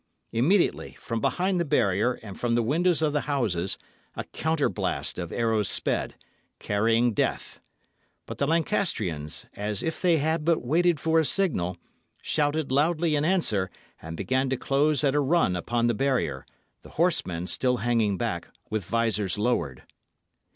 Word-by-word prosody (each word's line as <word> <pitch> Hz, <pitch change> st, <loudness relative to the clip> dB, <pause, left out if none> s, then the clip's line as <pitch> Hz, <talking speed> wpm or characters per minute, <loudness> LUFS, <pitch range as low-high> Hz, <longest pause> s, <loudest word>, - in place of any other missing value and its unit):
Immediately, 165 Hz, -, +1 dB
from 115 Hz, -2 st, -3 dB
behind 185 Hz, -, +1 dB
the -, -, +2 dB
barrier 120 Hz, -, +2 dB
and 100 Hz, -3 st, -9 dB
from 120 Hz, -1 st, +1 dB
the 120 Hz, -, +2 dB
windows 165 Hz, +6 st, +2 dB
of 150 Hz, -2 st, +1 dB
the 150 Hz, -, +1 dB
houses, 100 Hz, -10 st, 0 dB, 0.4 s
a -, -, -4 dB
counterblast 160 Hz, -10 st, -1 dB
of 85 Hz, -2 st, -5 dB
arrows 110 Hz, -4 st, +1 dB
sped, -, -, 0 dB, 0.4 s
carrying 115 Hz, +3 st, +1 dB
death. -, -, -2 dB, 0.7 s
But -, -, -8 dB
the 140 Hz, -, +1 dB
Lancastrians, 140 Hz, -, -1 dB
as 105 Hz, -1 st, -3 dB
if 165 Hz, -, -3 dB
they 175 Hz, -3 st, +4 dB
had 160 Hz, +2 st, 0 dB
but 165 Hz, -5 st, +1 dB
waited 170 Hz, +3 st, +2 dB
for 160 Hz, +2 st, +2 dB
a -, -, +3 dB
signal, 135 Hz, -, 0 dB, 0.4 s
shouted 150 Hz, -1 st, 0 dB
loudly 155 Hz, +3 st, +2 dB
in 145 Hz, -, +1 dB
answer; 155 Hz, -, +1 dB, 0.3 s
and 80 Hz, +1 st, -7 dB
began 130 Hz, +1 st, 0 dB
to 135 Hz, -, 0 dB
close 140 Hz, +2 st, +1 dB
at 140 Hz, -2 st, +3 dB
a 145 Hz, -, +2 dB
run 145 Hz, -, +2 dB
upon 115 Hz, +7 st, -1 dB
the 120 Hz, -, +2 dB
barrier, 115 Hz, -, -1 dB, 0.3 s
the -, -, -14 dB
horsemen 95 Hz, -, +1 dB
still 125 Hz, +6 st, +1 dB
hanging 115 Hz, -3 st, +1 dB
back, -, -, -3 dB, 0.2 s
with 110 Hz, -2 st, -1 dB
visors 105 Hz, -2 st, 0 dB
lowered. 105 Hz, -, -1 dB
130 Hz, 155 wpm, -26 LUFS, 105-160 Hz, 0.7 s, they